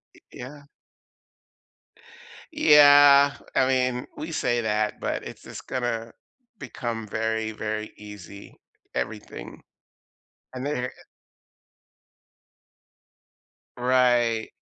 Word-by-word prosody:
Y -, -, -19 dB
yeah. 145 Hz, +3 st, -10 dB, 1.9 s
Yeah. 145 Hz, -1 st, +7 dB, 0.2 s
I 130 Hz, -, +3 dB
mean, 125 Hz, -1 st, 0 dB
we 155 Hz, +2 st, -6 dB
say 120 Hz, -6 st, 0 dB
that, 105 Hz, -1 st, -1 dB
but -, -, -3 dB
it's -, -, -10 dB
just -, -, -10 dB
gonna 115 Hz, -2 st, -3 dB, 0.4 s
become 115 Hz, -, -5 dB
very, 110 Hz, +1 st, -2 dB
very 110 Hz, 0 st, -5 dB
easy. 100 Hz, -1 st, -12 dB, 0.4 s
Everything. 60 Hz, -1 st, -6 dB, 0.9 s
And 130 Hz, +1 st, -5 dB
they, 145 Hz, -4 st, -2 dB
eh -, -, -4 dB, 2.9 s
Right. 120 Hz, -2 st, +2 dB
120 Hz, 85 wpm, -25 LUFS, 110-130 Hz, 2.9 s, Yeah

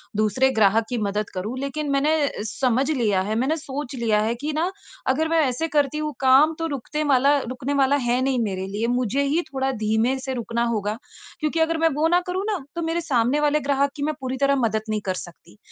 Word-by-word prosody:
दूसरे 215 Hz, +5 st, +2 dB
ग्राहक 220 Hz, +1 st, +4 dB
की 245 Hz, -, -2 dB
मदद 205 Hz, +1 st, -2 dB
करूँ, 205 Hz, +7 st, -4 dB
लेकिन 285 Hz, +2 st, -3 dB
मैंने 285 Hz, -3 st, +1 dB
समझ 260 Hz, +3 st, +1 dB
लिया 215 Hz, -9 st, +1 dB
है, 210 Hz, +3 st, -2 dB
मैंने 270 Hz, +7 st, +1 dB
सोच 285 Hz, -2 st, -6 dB
लिया 225 Hz, -4 st, +1 dB
है 225 Hz, +2 st, 0 dB
कि 305 Hz, +1 st, -1 dB
न 340 Hz, +3 st, +1 dB, 0.4 s
अगर 315 Hz, +4 st, 0 dB
मैं 330 Hz, 0 st, +3 dB
ऐसे 255 Hz, +6 st, -1 dB
करती 290 Hz, +1 st, +2 dB
हूँ 305 Hz, 0 st, -2 dB
काम 270 Hz, +4 st, +5 dB
तो 330 Hz, -, -1 dB
रुकते 300 Hz, +4 st, -3 dB
माला 280 Hz, 0 st, +4 dB
रुकने 255 Hz, +2 st, -4 dB
वाला 270 Hz, +1 st, +4 dB
है 250 Hz, -2 st, +1 dB
नहीं 265 Hz, -2 st, +1 dB
मेरे 190 Hz, -3 st, -3 dB
लिए। 210 Hz, +4 st, -2 dB
मुझे 250 Hz, +2 st, 0 dB
ही 295 Hz, +5 st, +1 dB
थोड़ा 265 Hz, 0 st, 0 dB
धीमे 220 Hz, +3 st, 0 dB
से 265 Hz, 0 st, -4 dB
रुकना 235 Hz, -1 st, -2 dB
होगा। 210 Hz, +1 st, -2 dB, 0.4 s
क्योंकि 310 Hz, +1 st, -1 dB
अगर 320 Hz, 0 st, +2 dB
मैं 325 Hz, 0 st, +3 dB
वो 305 Hz, +2 st, +2 dB
न 355 Hz, -, +6 dB
करूँ 370 Hz, +2 st, -2 dB
ना 375 Hz, -8 st, -3 dB
तो 340 Hz, -, -2 dB
मेरे 330 Hz, +1 st, -1 dB
सामने 265 Hz, -3 st, +1 dB
वाले 295 Hz, 0 st, +2 dB
ग्राहक 280 Hz, 0 st, +1 dB
की 285 Hz, -, -4 dB
मैं 310 Hz, +1 st, 0 dB
पूरी 260 Hz, -1 st, -3 dB
तरह 280 Hz, +1 st, +3 dB
मदद 225 Hz, -5 st, 0 dB
नहीं 215 Hz, -1 st, -1 dB
कर 190 Hz, -, 0 dB
सकती। 170 Hz, -11 st, -15 dB
265 Hz, 220 wpm, -23 LUFS, 230-300 Hz, 0.4 s, न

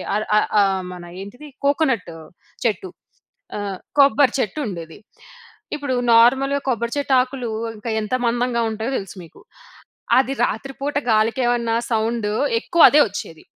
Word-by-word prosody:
అర 210 Hz, -, 0 dB, 0.2 s
ఆహ్, -, -, -1 dB
ఆహ్, 190 Hz, -1 st, +1 dB
మన 175 Hz, -1 st, -10 dB, 0.2 s
ఏంటిది 245 Hz, +9 st, -11 dB, 0.2 s
కోకోనట్ 270 Hz, -, +1 dB, 0.5 s
చెట్టు. 295 Hz, -, -1 dB, 0.7 s
ఆహ్, 200 Hz, -2 st, -4 dB, 0.2 s
కొబ్బరి 280 Hz, -1 st, +5 dB
చెట్టు 220 Hz, +6 st, -2 dB
ఉండేది. 165 Hz, -2 st, -8 dB, 0.8 s
ఇప్పుడు 285 Hz, -3 st, -2 dB, 0.2 s
నార్మల్‍గా, 270 Hz, +5 st, +4 dB
కొబ్బరి 235 Hz, -1 st, -1 dB
చెట్టు 280 Hz, -1 st, 0 dB
ఆకులు 255 Hz, -2 st, -4 dB, 0.3 s
ఇంకా, 230 Hz, +2 st, -6 dB
ఎంత 215 Hz, +3 st, -5 dB
మందంగా 240 Hz, 0 st, 0 dB
ఉంటాయో 220 Hz, +5 st, -3 dB
తెలుసు 195 Hz, 0 st, -7 dB
మీకు. 165 Hz, -, -16 dB, 0.8 s
అది 265 Hz, +1 st, 0 dB
రాత్రిపూట 275 Hz, +5 st, -5 dB, 0.2 s
గాలికి 220 Hz, +3 st, +2 dB
ఏమన్నా 235 Hz, -1 st, 0 dB, 0.2 s
సౌండ్ 225 Hz, -1 st, 0 dB, 0.3 s
ఎక్కువ 340 Hz, -2 st, +1 dB
అదే 295 Hz, -, +5 dB
వచ్చేది. 180 Hz, -5 st, -8 dB
235 Hz, 135 wpm, -21 LUFS, 210-270 Hz, 0.8 s, కొబ్బరి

